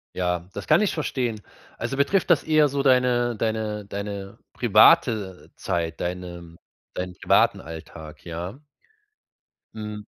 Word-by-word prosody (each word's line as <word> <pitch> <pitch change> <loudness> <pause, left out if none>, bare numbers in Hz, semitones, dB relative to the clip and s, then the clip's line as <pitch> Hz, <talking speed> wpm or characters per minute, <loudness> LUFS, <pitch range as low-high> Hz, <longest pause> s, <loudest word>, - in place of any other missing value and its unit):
Ja, 90 0 -2
das 100 - -7
kann 155 +6 +5
ich 210 - +1
verstehen. 125 -8 -2 0.4
Also, 135 - -3
betrifft 185 +9 +1
das 170 -5 +4
eher 155 -2 +4
so 140 0 -1
deine 125 -2 +3
deine 110 -1 -2
deine 100 -1 -6 0.2
private 100 -5 +3
Zeit, 85 -1 -3
deine 85 -1 -6 0.4
deinen 90 0 -4
privaten - - +3
Alltag, 80 -1 -10
ja? 90 - -6 1.2
Hm. 105 -1 -6
105 Hz, 125 wpm, -24 LUFS, 90-125 Hz, 1.2 s, kann